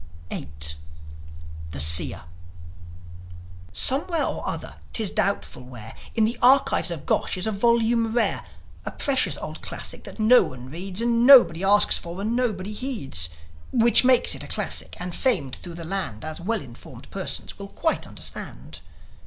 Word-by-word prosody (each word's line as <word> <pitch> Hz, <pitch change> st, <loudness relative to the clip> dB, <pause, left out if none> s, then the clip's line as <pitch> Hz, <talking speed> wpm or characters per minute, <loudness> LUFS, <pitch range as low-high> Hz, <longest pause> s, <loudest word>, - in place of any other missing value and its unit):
VIII. -, -, -6 dB, 1.2 s
THE 70 Hz, -, -7 dB
SEER 80 Hz, +2 st, +6 dB, 1.5 s
Somewhere 300 Hz, -, +2 dB
or -, -, -5 dB
other, -, -, -7 dB, 0.2 s
'tis 220 Hz, -4 st, 0 dB
doubtful 200 Hz, -9 st, -2 dB
where, 125 Hz, -3 st, -11 dB, 0.2 s
In 220 Hz, -2 st, +3 dB
the 235 Hz, +2 st, -2 dB
archives 260 Hz, -5 st, +4 dB
of 160 Hz, -4 st, -6 dB
Gosh -, -, -1 dB
is 185 Hz, -, -1 dB
a 220 Hz, -, -1 dB
volume 230 Hz, +1 st, +1 dB
rare, 235 Hz, 0 st, 0 dB, 0.4 s
A -, -, -5 dB
precious 275 Hz, -2 st, +1 dB
old -, -, -8 dB
classic -, -, -5 dB
that -, -, -10 dB
nobody 215 Hz, -, +3 dB
reads, 180 Hz, -, -6 dB
And 235 Hz, +1 st, +2 dB
nobody 215 Hz, -11 st, +7 dB
asks 205 Hz, +2 st, +4 dB
for, 170 Hz, +2 st, -9 dB
and 220 Hz, +4 st, -2 dB
nobody 210 Hz, -5 st, -2 dB
heeds; 205 Hz, -, -2 dB, 0.4 s
Which 235 Hz, +2 st, +5 dB
makes 255 Hz, -1 st, +3 dB
it -, -, -6 dB
a -, -, -9 dB
classic, -, -, -2 dB
and 180 Hz, 0 st, -5 dB
famed 180 Hz, -, +1 dB
thro' 175 Hz, -, -10 dB
the 170 Hz, -1 st, -8 dB
land, 160 Hz, -, -3 dB
As 155 Hz, +1 st, -6 dB
well 225 Hz, +4 st, -2 dB
informed 125 Hz, 0 st, -14 dB
persons 195 Hz, +1 st, -4 dB
will 200 Hz, -, -7 dB
quite 320 Hz, +10 st, -2 dB
understand. -, -, -7 dB
200 Hz, 155 wpm, -23 LUFS, 160-235 Hz, 1.5 s, nobody